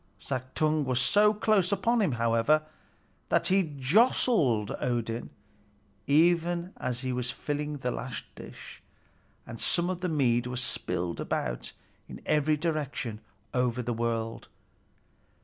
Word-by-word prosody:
Suttung 145 +4 -1
was 130 -2 0
so 210 +9 +5
close 210 -3 +2
upon 230 +4 +2
him, 175 -10 +1
however, 115 +6 +2 0.7
that - - +2
he 185 -6 +1
jostled 135 - +3
Odin 120 -1 -2 0.8
even 170 +4 +2
as 125 0 -3
he 130 -1 -2
was 125 0 -2
filling 150 +3 -3
the 125 -2 -2
last 125 +1 -5
dish, - - -11 0.6
and 115 -1 -9
some 175 +1 +1
of 180 -1 -5
the 180 - -1
mead 125 -6 +2
was 125 0 -1
spilled 85 -6 -1
about - - -3 0.4
in - - -8
every 150 0 +2
direction 145 -8 -3 0.3
over 125 -1 0
the 120 +1 -2
world. 115 0 -2
135 Hz, 130 wpm, -28 LUFS, 120-170 Hz, 0.8 s, so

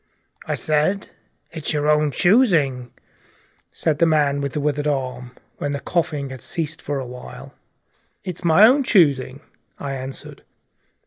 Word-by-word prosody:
"I - - -1
said 155 +6 0 0.4
it's 160 -2 -3
your 150 0 0
own 150 0 +3
choosing," 150 - +2 0.8
said 155 -3 -1
the 170 - +4
man 145 -3 +2
with 140 -1 -3
the 150 - -2
withered 145 0 -1
hand, 125 -3 -3 0.2
when 145 0 -3
the 140 - -3
coughing 150 -6 -2
had 130 -3 -9
ceased 155 +2 -3
for 145 -1 -3
a 130 - -5
while. 125 0 -10 0.7
"It's 180 -1 -6
my 170 +5 +6
own 260 +5 +5
choosing," 145 - +2 0.4
I 140 -1 -5
answered. 130 0 -8
150 Hz, 145 wpm, -21 LUFS, 135-165 Hz, 0.8 s, my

